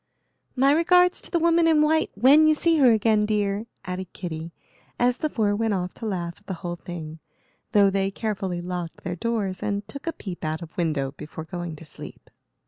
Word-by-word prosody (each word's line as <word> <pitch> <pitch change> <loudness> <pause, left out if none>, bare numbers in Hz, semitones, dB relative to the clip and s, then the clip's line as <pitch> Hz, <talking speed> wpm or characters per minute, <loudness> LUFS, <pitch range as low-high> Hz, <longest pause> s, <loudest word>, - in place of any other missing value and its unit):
"My 270 +2 +4
regards 360 +3 +4
to - - -8
the 345 - +1
Woman 335 0 +4
in 310 -2 +5
White 315 +1 +2
when 275 +9 +6
you 310 - +5
see 330 +1 +2
her 255 -4 +7
again, 215 -1 +3
dear," 210 0 0 0.2
added 185 0 -5
Kitty, 165 -2 -6 0.5
as 245 +1 +2
the 310 - -1
four 210 -6 +1
went 220 -1 0
off 180 -1 -3
to 225 - -6
laugh 175 -4 -3
at 205 - -32
the 190 - -3
whole 175 0 -2
thing, 165 -2 -8 0.5
though 200 -4 +5
they 195 0 +1
carefully 195 -4 -3
locked 175 -1 -5
their 175 +1 -3
doors 200 -2 -2
and 205 0 -2
took 280 +8 -9
a - - +1
peep 185 -4 -8
out 155 +2 -2
of 165 - -12
window 150 -6 -1
before 155 +1 -7
going 175 -1 -6
to 160 - -12
sleep. - - -11
200 Hz, 205 wpm, -25 LUFS, 175-250 Hz, 0.5 s, her